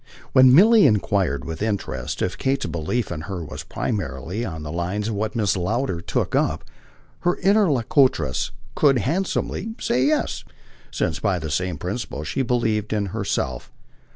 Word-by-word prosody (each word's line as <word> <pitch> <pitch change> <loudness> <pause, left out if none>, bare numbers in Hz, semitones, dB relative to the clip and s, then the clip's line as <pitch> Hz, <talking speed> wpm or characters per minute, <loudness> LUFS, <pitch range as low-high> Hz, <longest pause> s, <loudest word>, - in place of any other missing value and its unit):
When 130 0 +7
Milly 210 - +7
enquired 100 - +1
with 80 +4 -6
interest 105 -2 -2
if 90 - -1
Kate's 135 0 0
belief 85 +8 -2
in 80 -3 -4
HER 90 0 -5
was - - -7
primarily 90 - -3
on 80 -8 -5
the 75 - -6
lines 90 +6 -2
of - - -2
what 105 +1 -2
Mrs. 105 -3 +1
Lowder 95 0 -1
"took - - -2
up," - - +1 0.6
her 175 - +1
interlocutress 145 - +2 0.2
could 140 -3 +4
handsomely 190 - -1
say 125 +1 +1
yes, 155 - 0 0.5
since 80 - -2
by 100 -4 +1
the 80 -3 -5
same 90 +2 -1
principle 90 - -4
she 75 - -2
believed 115 -4 0
in 105 -1 0
herself. 80 - -2
105 Hz, 155 wpm, -23 LUFS, 85-130 Hz, 0.6 s, When